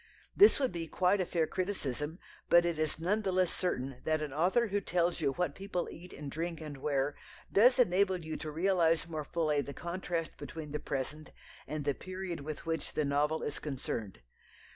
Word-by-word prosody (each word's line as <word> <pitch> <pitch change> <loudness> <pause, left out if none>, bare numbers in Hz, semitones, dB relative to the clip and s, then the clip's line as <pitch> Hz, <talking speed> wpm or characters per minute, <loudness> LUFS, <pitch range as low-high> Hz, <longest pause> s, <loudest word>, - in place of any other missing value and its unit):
This 410 +2 +8
would 265 -2 +1
be 170 -2 -4
quite 185 +4 +2
a 180 - -1
fair 165 -2 +1
criticism, 160 -5 -2 0.3
but 170 0 +7
it 170 -2 0
is 155 -1 0
none 190 +7 +1
the 195 -3 0
less 185 -1 +2
certain 135 -8 -2
that 155 0 +1
an 145 -3 -5
author 190 +10 +3
who 205 +1 0
tells 175 -2 +1
you 140 -3 +2
what 175 -3 0
people 195 -1 -3
eat 180 +2 -11
and 140 -1 -7
drink 165 +2 -3
and 150 -3 -7
wear 140 +1 0 0.4
does 245 +6 +6
enable 190 -4 +4
you 160 -2 -5
to 155 - -5
realize 165 0 +2
more 155 -3 -4
fully 155 -2 +1
the 140 -1 -7
contrast 170 -1 -3
between 150 +1 -7
the 150 - -2
present 150 +3 -4 0.4
and 150 -1 -3
the 145 - +2
period 185 +1 -5
with 150 +2 -6
which 165 0 -2
the 155 - +1
novel 145 +3 +1
is 145 - -3
concerned. 120 -8 -4
165 Hz, 195 wpm, -32 LUFS, 150-180 Hz, 0.4 s, This